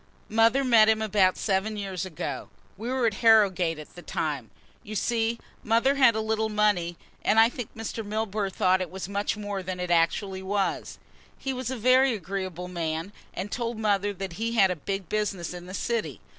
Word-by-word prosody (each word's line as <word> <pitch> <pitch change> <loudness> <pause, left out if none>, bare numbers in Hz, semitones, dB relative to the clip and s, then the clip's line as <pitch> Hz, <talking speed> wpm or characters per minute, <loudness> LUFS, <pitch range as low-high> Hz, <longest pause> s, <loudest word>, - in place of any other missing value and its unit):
"Mother 225 +5 +4
met 225 -4 +6
him 220 0 +3
about 205 -4 +3
seven 210 +1 0
years 190 -2 -4
ago. 150 -5 -5 0.3
We 225 +5 -5
were 255 -1 +1
at 225 - +2
Harrogate 195 -7 +4
at 155 - -11
the 175 - -10
time. 145 -9 -3 0.3
You 215 - -8
see, 230 +2 0 0.3
mother 230 +5 +3
had 260 -5 +5
a 220 - 0
little 220 0 0
money, 205 -5 +1 0.3
and 220 - +4
I 225 +1 +7
think 245 -2 -7
Mr. 225 0 -5
Milburgh 210 -1 -2
thought 185 0 +2
it 185 - -3
was 190 -1 -6
much 200 +1 -1
more 205 -2 -4
than 185 0 -5
it 180 -1 -2
actually 190 +3 +1
was. 195 +1 -2 0.4
He 270 - -3
was 255 -2 -4
a 260 - -3
very 255 +2 +4
agreeable 185 -2 -5
man 165 +1 -3 0.2
and 200 +2 -4
told 235 -1 -2
mother 205 -2 +1
that 195 -2 -6
he 230 +1 0
had 195 -5 +5
a - - -1
big 195 +3 -4
business 200 -5 -2
in 175 0 -9
the 185 - -6
city. 220 - -2
205 Hz, 195 wpm, -27 LUFS, 185-225 Hz, 0.4 s, I